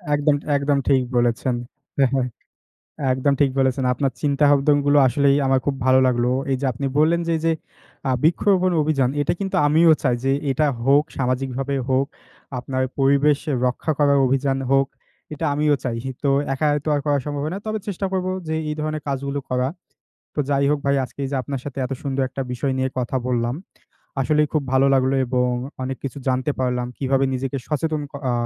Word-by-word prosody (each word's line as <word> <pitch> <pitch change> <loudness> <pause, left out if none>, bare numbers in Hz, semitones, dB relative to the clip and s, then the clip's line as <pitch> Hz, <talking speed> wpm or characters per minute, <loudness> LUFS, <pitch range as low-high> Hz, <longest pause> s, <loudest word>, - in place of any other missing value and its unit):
একদম, 145 0 +2 0.2
একদম 140 0 +1
ঠিক 135 -2 +4 0.2
বলেছেন, 120 +1 +1 0.4
হ্যাঁ, 135 -2 +4
হ্যাঁ। 130 -2 +1 0.9
একদম 130 +2 +1
ঠিক 140 -2 +4
বলেছেন, 130 0 +1
আপনার 135 -2 -1
চিন্তাভাবনাগুলো 145 0 +3
আসলেই 140 +2 +3
আমার 135 0 +3
খুব 140 - +1
ভালো 130 0 +5
লাগলো। 120 0 +1 0.2
এই 135 - +2
যে 140 - 0
আপনি 135 +4 -4
বললেন 165 +3 +3
যে, 165 - +2
যে 165 - +3 0.6
আ - - +2
বৃক্ষরোপণ 185 +3 +3
অভিযান 140 -4 +1
এটা 165 +4 +1
কিন্তু 195 -1 -2
আমিও 160 +2 +5
চাই 125 -3 +2
যে 135 - +2 0.2
এটা 150 +3 +2 0.2
হোক, 140 +2 +4
সামাজিকভাবে 135 +1 -1
হোক, 135 +1 +2 0.5
আপনার 130 +1 -2 0.2
পরিবেশ 140 +2 +3 0.3
রক্ষা 125 +5 -1
করার 140 -1 +4
অভিযান 135 +1 +1
হোক, 135 0 +4 0.5
এটা - - -5
আমিও 150 0 +2
চাই। 120 -2 -2 0.3
তো 140 - +1 0.3
একাই 150 +2 +1
তো - - -3
আর 145 - +1
করা 145 -1 +2
সম্ভব 145 0 -3
না, - - -3
তবে 215 0 -1
চেষ্টা 195 0 -2
করব 185 -1 -1 0.2
যে, 160 - -1 0.2
এই - - -2
ধরনের 155 0 -3
কাজগুলো 140 +1 -2
করা। 125 +1 +1 0.7
তো 150 - 0
যাই 140 0 +2
হোক, 150 - +2
ভাই 140 0 +3
আজকে 125 - -13
এই - - -5
যে - - 0
আপনার 135 -1 -4
সাথে 140 -1 -7
এত 130 - -5
সুন্দর 135 -1 -1
একটা 135 +1 -4
বিষয় 130 +2 -1
নিয়ে 130 0 +1
কথা 125 +1 -1
বললাম, 120 0 0 0.7
আসলেই 150 +2 +2
খুব 155 -2 +1
ভালো 130 +1 +4
লাগলো 130 0 +2
এবং 125 0 +1 0.3
অনেক 130 +1 -3
কিছু 140 +1 -4
জানতে 130 +3 0
পারলাম। 125 -1 0
কিভাবে 135 0 +1
নিজেকে 135 +1 -3
সচেতন 155 0 -1 0.3
আ - - +1
140 Hz, 185 wpm, -22 LUFS, 130-150 Hz, 0.9 s, ভালো